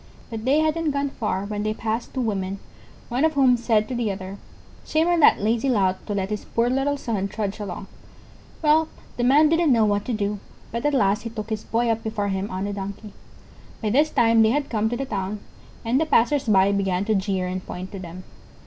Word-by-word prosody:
But 225 Hz, 0 st, -5 dB
they 285 Hz, +4 st, +4 dB
hadn't 315 Hz, 0 st, +1 dB
gone 280 Hz, -1 st, -1 dB
far 205 Hz, -5 st, -2 dB
when 205 Hz, 0 st, -3 dB
they 215 Hz, +1 st, -1 dB
passed 225 Hz, +2 st, -3 dB
two 260 Hz, -, 0 dB
women, 195 Hz, -4 st, -2 dB, 0.5 s
one 250 Hz, +4 st, 0 dB
of 320 Hz, 0 st, +3 dB
whom 265 Hz, -3 st, +5 dB
said 225 Hz, -3 st, +1 dB
to 255 Hz, -, -5 dB
the 235 Hz, -4 st, -1 dB
other: 190 Hz, +1 st, -7 dB, 0.4 s
"Shame 315 Hz, +2 st, +1 dB
on 350 Hz, -1 st, +3 dB
that 300 Hz, -, +6 dB
lazy 230 Hz, +5 st, +1 dB
lout 190 Hz, -6 st, +1 dB
to 205 Hz, -, -2 dB
let 195 Hz, +1 st, -2 dB
his 210 Hz, -, -3 dB
poor 235 Hz, +1 st, 0 dB
little 275 Hz, +2 st, 0 dB
son 215 Hz, -7 st, -2 dB
trudge 205 Hz, 0 st, -4 dB
along." 200 Hz, -1 st, -5 dB, 0.8 s
Well, 310 Hz, +1 st, +4 dB, 0.3 s
the 240 Hz, -, 0 dB
Man 285 Hz, +5 st, +5 dB
didn't 330 Hz, -1 st, +3 dB
know 230 Hz, -3 st, +4 dB
what 205 Hz, -1 st, +1 dB
to 250 Hz, -, -2 dB
do, 205 Hz, -1 st, -2 dB, 0.3 s
but 235 Hz, +5 st, -1 dB
at 295 Hz, -, +1 dB
last 200 Hz, -4 st, +2 dB
he 230 Hz, -, -5 dB
took 220 Hz, -1 st, -7 dB
his 215 Hz, -1 st, -2 dB
Boy 235 Hz, +1 st, 0 dB
up 225 Hz, 0 st, -1 dB
before 210 Hz, -2 st, -2 dB
him 195 Hz, +1 st, -2 dB
on 185 Hz, +1 st, -3 dB
the 205 Hz, 0 st, -3 dB
Donkey. 200 Hz, +1 st, -7 dB, 0.7 s
By 215 Hz, -2 st, -1 dB
this 295 Hz, +6 st, +3 dB
time 230 Hz, -4 st, +4 dB
they 220 Hz, -, +5 dB
had 285 Hz, +4 st, -1 dB
come 220 Hz, -1 st, +1 dB
to 240 Hz, -, -2 dB
the 270 Hz, -, -3 dB
town, 200 Hz, -3 st, -3 dB, 0.5 s
and 250 Hz, +6 st, +2 dB
the 320 Hz, -, 0 dB
passers 285 Hz, +2 st, +3 dB
by 200 Hz, -3 st, +4 dB
began 195 Hz, -1 st, 0 dB
to 220 Hz, -, +1 dB
jeer 190 Hz, -2 st, 0 dB
and 185 Hz, 0 st, -4 dB
point 185 Hz, +1 st, -7 dB
to 195 Hz, -, -7 dB
them. 180 Hz, 0 st, -9 dB
220 Hz, 230 wpm, -23 LUFS, 200-260 Hz, 0.8 s, that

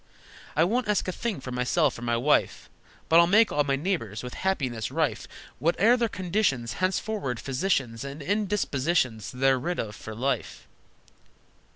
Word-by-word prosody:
I 160 Hz, -, +4 dB
won't 230 Hz, +7 st, 0 dB
ask 210 Hz, -2 st, +1 dB
a -, -, 0 dB
thing 210 Hz, -, -3 dB
for 130 Hz, -, -7 dB
myself 125 Hz, +3 st, +1 dB
or -, -, -10 dB
my 120 Hz, -1 st, 0 dB
wife, 145 Hz, +5 st, +1 dB, 0.4 s
But 165 Hz, -, +6 dB
I'll 170 Hz, -, +6 dB
make 215 Hz, +4 st, +5 dB
all 145 Hz, -, +2 dB
my 140 Hz, -1 st, 0 dB
neighbors 135 Hz, -, -3 dB
with 125 Hz, -, -6 dB
happiness 130 Hz, -, -2 dB
rife. -, -, -1 dB, 0.3 s
Whate'er 200 Hz, +9 st, +4 dB
their 235 Hz, -2 st, 0 dB
conditions, 175 Hz, -, -1 dB
Henceforward, 185 Hz, -, -1 dB
physicians 135 Hz, -, -1 dB
And 140 Hz, +2 st, -7 dB
indispositions 170 Hz, -, 0 dB
they're 135 Hz, +1 st, +2 dB
rid 175 Hz, +7 st, -2 dB
of 105 Hz, -2 st, -4 dB
for 110 Hz, -, -8 dB
life!" 135 Hz, +5 st, -3 dB
145 Hz, 160 wpm, -27 LUFS, 125-190 Hz, 0.4 s, But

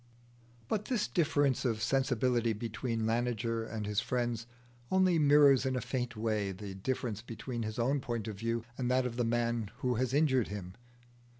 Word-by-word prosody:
But 210 Hz, -, -1 dB
this 235 Hz, -5 st, 0 dB
difference 145 Hz, -6 st, +2 dB
of 115 Hz, -4 st, 0 dB
sensibility 125 Hz, -1 st, +1 dB
between 115 Hz, +1 st, -3 dB
Laniger 115 Hz, 0 st, 0 dB
and 110 Hz, -2 st, -3 dB
his 105 Hz, 0 st, 0 dB
friends 120 Hz, -1 st, -2 dB, 0.4 s
only 185 Hz, -3 st, +3 dB
mirrors 145 Hz, -3 st, +6 dB
in 130 Hz, -1 st, 0 dB
a -, -, +1 dB
faint 125 Hz, 0 st, -3 dB
way 105 Hz, -3 st, 0 dB
the 95 Hz, +1 st, -7 dB
difference 110 Hz, +1 st, -3 dB
between 120 Hz, +1 st, -5 dB
his 110 Hz, +1 st, -4 dB
own 130 Hz, +4 st, +1 dB
point 120 Hz, -4 st, -3 dB
of 110 Hz, -, -4 dB
view 115 Hz, +1 st, -1 dB, 0.2 s
and 125 Hz, -1 st, 0 dB
that 130 Hz, 0 st, +2 dB
of 120 Hz, -2 st, -3 dB
the 120 Hz, -, 0 dB
man 115 Hz, -2 st, 0 dB
who 125 Hz, -2 st, +1 dB
has 130 Hz, 0 st, 0 dB
injured 135 Hz, -4 st, +3 dB
him. 95 Hz, -3 st, -6 dB
120 Hz, 175 wpm, -32 LUFS, 110-130 Hz, 0.4 s, mirrors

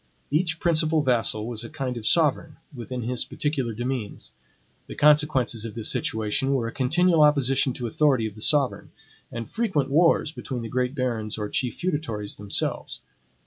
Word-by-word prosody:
Each 165 Hz, +2 st, +1 dB
principal 160 Hz, -2 st, +2 dB
vassal 115 Hz, -4 st, +2 dB
was 115 Hz, -1 st, -5 dB
a 115 Hz, -, -7 dB
kind 130 Hz, -2 st, -4 dB
of 115 Hz, -2 st, -4 dB
sovereign, 155 Hz, -1 st, +2 dB, 0.2 s
within 125 Hz, -1 st, -6 dB
his 125 Hz, +1 st, -2 dB
particular 140 Hz, -6 st, -2 dB
demesnes. 120 Hz, -, -5 dB, 0.6 s
The -, -, -8 dB
consequences 150 Hz, -6 st, +3 dB
of 115 Hz, -3 st, -6 dB
this 115 Hz, -2 st, -1 dB
situation 110 Hz, +6 st, -1 dB
were 120 Hz, -3 st, -1 dB
a -, -, -4 dB
continual 160 Hz, +6 st, +2 dB
opposition 140 Hz, -3 st, +3 dB
to 125 Hz, -, -6 dB
authority 130 Hz, -1 st, +2 dB
of 110 Hz, -, -4 dB
the 105 Hz, -, -10 dB
sovereign, 145 Hz, 0 st, +2 dB, 0.4 s
and 115 Hz, -1 st, -5 dB
frequent 190 Hz, -, -1 dB
wars 165 Hz, 0 st, +3 dB
between 130 Hz, -5 st, -6 dB
the 115 Hz, -, -6 dB
great 125 Hz, +3 st, -1 dB
barons 115 Hz, -6 st, -2 dB
or 105 Hz, -1 st, -3 dB
chief 125 Hz, -2 st, -2 dB
feudatories 145 Hz, -, -3 dB
themselves. 100 Hz, -1 st, -3 dB
130 Hz, 165 wpm, -25 LUFS, 115-150 Hz, 0.6 s, consequences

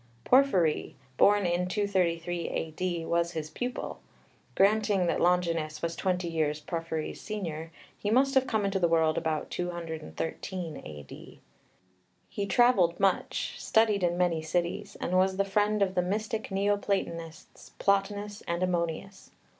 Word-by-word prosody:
Porphyry, 190 Hz, -, +3 dB, 0.2 s
born 205 Hz, +6 st, +5 dB
in 175 Hz, +1 st, +1 dB
233 175 Hz, -4 st, 0 dB
A.D., 165 Hz, +1 st, -3 dB
was 170 Hz, +1 st, 0 dB
his 155 Hz, -1 st, -4 dB
pupil: 250 Hz, 0 st, -4 dB, 0.6 s
granting 205 Hz, -1 st, +3 dB
that 170 Hz, -, 0 dB
Longinus 165 Hz, -3 st, +1 dB
was 170 Hz, 0 st, -1 dB
twenty 180 Hz, -2 st, -1 dB
years 155 Hz, -2 st, 0 dB
Porphyry's 160 Hz, 0 st, -4 dB
senior, 165 Hz, -7 st, -5 dB, 0.3 s
he 205 Hz, -, -2 dB
must 265 Hz, +4 st, +3 dB
have 265 Hz, -1 st, +3 dB
come 215 Hz, -3 st, 0 dB
into 195 Hz, 0 st, 0 dB
the 175 Hz, -, +3 dB
world 160 Hz, -1 st, +3 dB
about 160 Hz, -2 st, -2 dB
213 170 Hz, 0 st, -4 dB
A.D. 75 Hz, -2 st, -11 dB, 0.9 s
He 200 Hz, -, -3 dB
travelled 195 Hz, -5 st, +4 dB
much, 195 Hz, -1 st, 0 dB
studied 220 Hz, -3 st, +3 dB
in 175 Hz, -1 st, +1 dB
many 175 Hz, -3 st, +1 dB
cities, 175 Hz, +5 st, -2 dB
and 180 Hz, -, -3 dB
was 190 Hz, 0 st, +2 dB
the 200 Hz, -, +2 dB
friend 205 Hz, +1 st, +2 dB
of 190 Hz, -1 st, -1 dB
the 180 Hz, -, +2 dB
mystic 215 Hz, +4 st, -2 dB
Neoplatonists, 195 Hz, -5 st, -2 dB
Plotinus 205 Hz, +1 st, 0 dB
and 170 Hz, +1 st, -1 dB
Ammonius. 180 Hz, +2 st, -2 dB
180 Hz, 135 wpm, -29 LUFS, 165-200 Hz, 0.9 s, born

